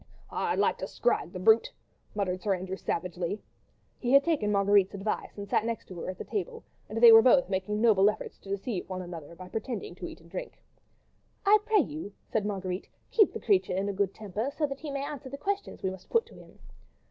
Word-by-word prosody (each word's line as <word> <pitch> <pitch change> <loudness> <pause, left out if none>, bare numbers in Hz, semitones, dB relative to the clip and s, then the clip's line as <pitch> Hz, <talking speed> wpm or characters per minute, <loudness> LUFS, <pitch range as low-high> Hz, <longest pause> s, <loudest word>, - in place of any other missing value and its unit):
"I'd - - -1
like - - +2
to - - -3
scrag - - 0
the - - -6
brute!" 455 +3 +4 0.4
muttered 185 -3 -1
Sir 200 -2 +1
Andrew, 185 +1 -5
savagely. 180 +2 -3 0.6
He 245 +1 0
had 275 0 +8
taken 285 -11 +1
Marguerite's 200 -1 +3
advice 200 +2 -3
and 200 0 -6
sat 205 - +2
next 230 0 -3
to 180 -2 -8
her - - -4
at 185 - -6
table, 460 +3 -4 0.3
and 220 - -3
they 235 0 +10
were 225 0 +10
both 260 +1 +5
making 195 +2 -1
noble 210 -4 +6
efforts 215 - -6
to 195 - -14
deceive 200 0 -3
one 185 -1 -4
another, 170 -2 -9
by 185 +1 -10
pretending 245 - -4
to - - -7
eat - - -10
and - - -19
drink. - - -6 0.9
"I 420 +2 +7
pray 435 -3 +5
you," 300 -10 -6
said 210 -2 -1
Marguerite, 190 -2 -4 0.2
"keep 425 -4 +5
the - - -5
creature 380 - +2
in 200 +1 0
a - - -2
good 195 0 0
temper, 215 +5 -3
so 310 - +2
that 275 -1 -5
he 310 - -6
may 280 0 -3
answer 280 -2 -7
the 280 - -6
questions 400 +5 -3
we 190 - 0
must 190 -1 -11
put 460 -1 +3
to - - -17
him." - - -15
210 Hz, 220 wpm, -29 LUFS, 190-280 Hz, 0.9 s, they